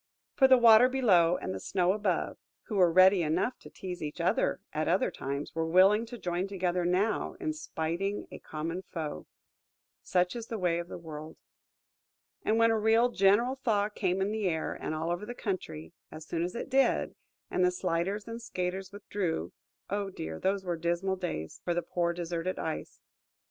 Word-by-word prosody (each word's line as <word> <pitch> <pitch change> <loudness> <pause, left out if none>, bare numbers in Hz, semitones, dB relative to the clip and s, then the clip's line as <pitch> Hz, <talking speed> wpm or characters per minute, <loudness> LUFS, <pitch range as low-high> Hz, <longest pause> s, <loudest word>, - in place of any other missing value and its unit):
For 265 - +5
the 260 -1 +7
Water 235 +1 +7
below 185 -10 +4
and 95 - -4
the 95 - -5
Snow 180 - +1
above, 205 -4 -1 0.2
who 215 - -6
were 180 -3 +5
ready 185 +2 +6
enough 170 +10 0
to - - -13
tease 180 -2 -7
each 150 -1 -5
other - - +1
at - - -1
other - - +2
times, 140 +2 -5
were 165 0 -1
willing 195 +6 +5
to 240 +1 -8
join 180 -1 -2
together 180 -2 -1
now 195 - 0
in 320 -4 -2
spiting 195 - -3
a - - -8
common 165 +4 -4
foe. 160 -5 -6 0.7
Such 180 +2 +1
is 230 -1 -6
the 225 - -4
way 175 -3 +1
of 170 - -5
the - - -7
world! 155 -2 -9 1.1
And 220 - +2
when 230 0 +5
a 225 - +2
real 225 +3 +4
general 235 +5 +3
thaw 210 -3 +2
came 190 -3 -1
in 200 - -1
the 215 -2 -1
air, 160 -3 -1
and 155 - -4
all 160 +2 -2
over 175 +3 -2
the 240 +3 -6
country, 180 -7 -5 0.2
as 155 - -8
it 170 +1 0
soon 235 - -5
did, 270 0 +2 0.4
and 180 - +1
the 180 - +5
sliders 180 +3 -2
and 230 +1 -6
skaters 185 -3 -4
withdrew–oh, 200 0 -4
dear, 80 - -6
those 195 0 0
were 175 -2 -1
dismal 175 +3 0
days 80 - -5
for 175 - -1
the 175 - 0
poor 170 +1 0
deserted 170 +1 -3
Ice! 160 -1 -5
185 Hz, 185 wpm, -30 LUFS, 170-210 Hz, 1.1 s, the